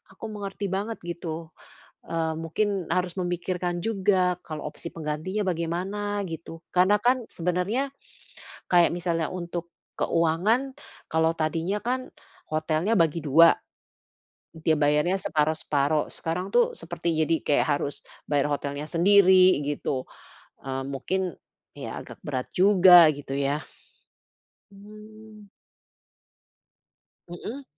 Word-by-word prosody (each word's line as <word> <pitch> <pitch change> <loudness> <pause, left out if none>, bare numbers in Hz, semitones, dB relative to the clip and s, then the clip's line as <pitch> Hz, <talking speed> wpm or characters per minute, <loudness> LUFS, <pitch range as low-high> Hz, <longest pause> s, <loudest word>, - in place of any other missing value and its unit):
aku 225 - -8
mengerti 200 -1 -5
banget 205 +4 -3
gitu. 170 -2 -5 0.6
Eee, 165 -1 -1
mungkin 190 +3 -1
harus 180 -1 -1
memikirkan 175 0 -2
juga 190 -4 +2
kalau 155 -2 -6
opsi 170 - -8
penggantinya 160 +6 -3
bagaimana 185 +5 -2
gitu. 165 0 -8
Karena 185 +3 +5
kan 250 +1 +2
sebenernya, 180 +10 -1 0.8
kayak 175 -1 +5
misalnya 170 -2 -1
untuk 175 -1 -5 0.3
keuangan. 210 +12 +1 0.4
Kalau 160 0 +2
tadinya 165 +5 -1
kan 255 +2 -2 0.4
hotelnya 155 +6 +1
bagi 165 -1 +2
dua. 165 +4 +7 1.0
Dia 160 0 +1
bayarnya 150 +5 +2
separuh-separuh. 155 -2 0
Sekarang 180 +4 -3
tuh 240 - +4
seperti 170 0 -3
jadi 165 - +2
kayak 145 - +3
harus 145 - -4 0.3
bayar 145 0 +2
hotelnya 145 +1 -3
sendiri 185 -2 +6
gitu. 140 -2 -2 0.6
Eee, 135 0 -3
mungkin 180 +7 -2 0.4
ya - - -6
agak - - -12
berat 130 -3 -3
juga 180 -3 +8
gitu 140 -1 -8
ya. 140 +2 -1 1.1
Mmm. 215 +1 -14 1.8
Hmm. 220 +10 -7
175 Hz, 110 wpm, -26 LUFS, 160-195 Hz, 1.8 s, juga